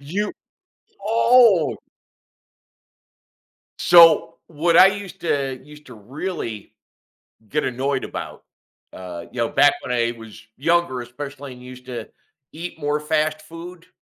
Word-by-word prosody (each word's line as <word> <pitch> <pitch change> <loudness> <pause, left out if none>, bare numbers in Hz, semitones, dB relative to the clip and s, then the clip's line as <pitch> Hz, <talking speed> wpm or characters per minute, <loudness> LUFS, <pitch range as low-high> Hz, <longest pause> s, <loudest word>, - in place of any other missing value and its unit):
You 190 +9 -3 0.7
oh! 225 -3 +4 2.0
So, 170 -2 +6
what 165 +2 +1
I 185 - +9
used 195 -1 -4
to 135 -5 -2
used 150 +1 -16
to 125 - -12
really 115 - -6 0.8
get 150 +5 -1
annoyed 130 +2 -2
about, - - -7 0.5
uh, 90 -2 -8
you 125 - -9
know, 115 - +1
back 145 +1 +4
when 125 - -4
I 120 -1 +1
was 115 0 -12
younger, 165 -3 +1
especially, 140 +3 -8
and 125 - -15
used 125 0 -12
to 120 -3 -7 0.4
eat 170 +1 -7
more 145 0 -1
fast 155 0 -1
food, 170 +2 -11
145 Hz, 125 wpm, -21 LUFS, 125-170 Hz, 2.0 s, I